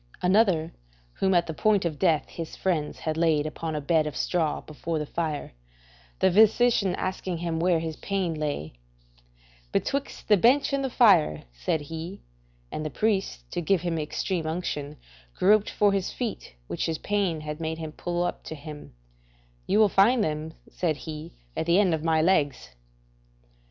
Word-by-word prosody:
Another, 180 -4 +3 0.5
whom 190 -1 +3
at 175 - +4
the 160 - -5
point 205 +2 +2
of 155 -4 -2
death 160 -6 +2
his 165 -2 -7
friends 165 -6 -1
had 155 0 -2
laid 160 -3 +2
upon 155 +1 -4
a 150 - -2
bed 155 +1 +2
of 150 - -5
straw 165 -4 0
before 160 +2 -4
the 150 - -2
fire, 155 - -3 0.6
the 190 - +3
physician 215 -1 +4
asking 185 -1 -3
him 165 -1 -2
where 175 0 +3
his 160 -1 -4
pain 190 -4 -1
lay: 145 - -3 1.0
"Betwixt 280 0 -2
the 210 - +6
bench 265 +8 +4
and 275 0 +1
the 265 - -1
fire," 190 - +4
said - - -2
he, 160 +5 -7 0.5
and 155 - -4
the 155 - -2
priest, 195 - 0
to - - -2
give 175 +1 +2
him 170 -2 -1
extreme 160 +2 -2
unction, 150 -3 -3 0.4
groping 210 +2 +4
for 205 -1 +5
his 195 -2 -1
feet 235 - -5
which 85 +7 -3
his 160 -1 -1
pain 195 -6 -1
had 150 0 -5
made 160 0 -2
him 160 -1 -6
pull 175 +2 -2
up 175 - -3
to 160 - -6
him: 150 - -10 0.7
"You 200 - +2
will 215 -1 +6
find 215 +5 +4
them," 155 0 -3 0.2
said 165 -4 0
he, 155 +1 -8 0.2
"at - - -2
the 170 +2 +4
end 190 -5 +3
of 160 -1 -2
my 160 -1 +2
legs." 145 - +1
165 Hz, 175 wpm, -26 LUFS, 155-190 Hz, 1.0 s, the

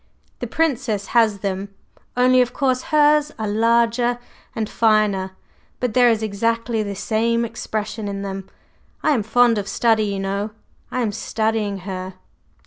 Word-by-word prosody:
The - - -4
Princess 250 -10 0
has 220 -4 +3
them 195 0 -4 0.4
only, 255 0 +5
of 250 0 0
course, 260 -2 +1
hers 300 -1 +4
are 220 - -3
larger 235 +3 +2 0.4
and 220 -1 -1
finer; 210 -4 +2 0.5
but 250 -3 -1
there 245 0 +5
is 225 -1 +1
exactly 230 +2 -1
the 200 -1 -4
same 230 +3 0
expression 215 -1 -4
in 200 0 -4
them. 195 -1 -6 0.5
I - - +3
am 255 -7 +2
fond 230 +1 +3
of 200 - -5
study, 220 +1 +2
you 200 -1 -2
know; 200 +2 -3 0.4
I 255 - -2
am 220 -3 0
studying 215 -2 -2
her. 185 -1 -5
220 Hz, 150 wpm, -21 LUFS, 200-240 Hz, 0.5 s, only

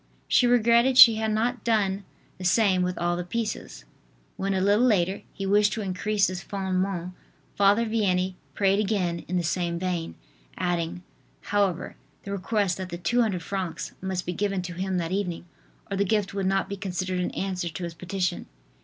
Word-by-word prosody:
She 245 - +4
regretted 240 +2 +4
she 230 -3 +10
had 220 0 0
not 225 +2 0
done 200 -4 +1 0.3
the - - -7
same 185 0 +3
with 180 0 -1
all 175 0 0
the 175 - -3
pieces. 220 +5 -4 0.5
When, 195 0 -1
a - - +1
little 205 +4 +3
later, 195 -6 +2
he 195 - -5
wished 205 +1 +3
to 220 - -3
increase 200 +2 0
this 185 -2 -3
"Fondement" 190 -2 -2 0.4
Father 205 +3 +4
Vianney 190 -4 +1 0.2
prayed 195 0 +3
again 190 -5 0
in 180 - -1
the 175 - 0
same 170 0 -1
vein, 170 - -3 0.4
adding, 175 0 -2 0.4
however, 200 -4 -1 0.3
the 200 - -6
request 200 -1 0
that 185 -1 -5
the 170 - -5
200 195 0 0
francs 190 -3 -4
must 185 -1 -3
be 180 - -2
given 195 0 -1
to 180 -1 -6
him 185 +1 -2
that 170 -1 -2
evening, 180 -3 -2 0.5
or - - 0
the 200 - +3
gift 205 0 0
would 195 -1 -1
not 195 0 +1
be 200 - -5
considered 185 -1 -3
an 180 - 0
answer 185 -3 -2
to 170 +3 -7
his 170 -1 -4
petition. 180 +1 -3
190 Hz, 180 wpm, -26 LUFS, 180-205 Hz, 0.5 s, she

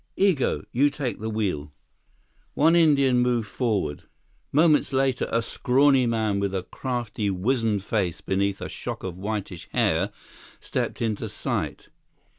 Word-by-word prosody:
Igo, 185 -9 +2
you 140 +4 +3
take 145 -4 -4
the 110 +1 -3
wheel." 95 -10 -2 0.8
One 160 +3 +4
Indian 140 -6 +4
moved 120 -2 +1
forward. 105 - -1 0.5
Moments 155 -1 +4
later, 135 -2 +1
a 115 0 +1
scrawny 130 +2 +3
man 110 -3 0
with 100 -1 -1
a 95 - -1
crafty, 120 -3 -3
wizened 105 +1 0
face 95 -7 -1
beneath 100 0 -1
a - - -3
shock - - -6
of 95 -2 -4
whitish 100 -2 -5
hair, - - +1 0.5
stepped - - -3
into 110 -3 -2
sight. - - -3
115 Hz, 135 wpm, -25 LUFS, 100-135 Hz, 0.8 s, One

